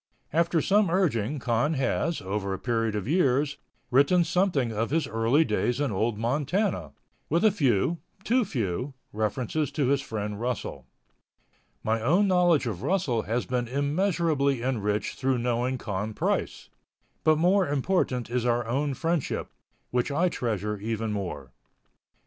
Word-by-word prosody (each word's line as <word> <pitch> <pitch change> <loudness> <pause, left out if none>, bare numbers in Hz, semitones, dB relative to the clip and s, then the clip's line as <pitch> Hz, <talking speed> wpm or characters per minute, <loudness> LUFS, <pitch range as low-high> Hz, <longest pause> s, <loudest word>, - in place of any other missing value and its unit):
After 170 0 +2
some 205 -1 +3
urging 150 - +1
Con 125 +3 +1
has, 150 +5 0
over 100 0 -2
a - - -6
period 115 -2 -1
of 105 0 -3
years, 145 -3 +2 0.3
written 140 +8 +5
something 170 -10 +1
of 110 +1 -1
his 160 +2 +1
early 115 +8 +2
days 125 -2 0
in 145 -4 0
Old 105 +3 0
Montana, 140 - -1 0.4
with 170 +7 +2
a 215 - +6
few, 150 - +1 0.2
too 245 +3 +3
few, 125 - -3 0.2
references 120 +7 -1
to 140 -4 +1
his 140 0 +2
friend 105 -4 -4
Russell. 125 +1 -4 1.0
My 110 +1 0
own 175 - +3
knowledge 175 -6 +3
of 105 -6 -3
Russell 150 - +1
has 115 +3 -2
been 125 -1 -1
immeasurably 145 - +1
enriched 105 -5 -1
through 130 -1 +1
knowing 120 +2 0
Con 105 -1 -4
Price, - - -2 0.5
but 155 -1 +4
more 180 +3 +3
important 140 -4 0
is 125 0 -1
our 120 -1 +1
own 135 +4 -1
friendship, 165 -2 -2 0.4
which 125 +2 0
I 170 +6 +2
treasure 105 - -2
even 110 +1 -2
more. 75 -10 -5
130 Hz, 145 wpm, -27 LUFS, 115-160 Hz, 1.0 s, a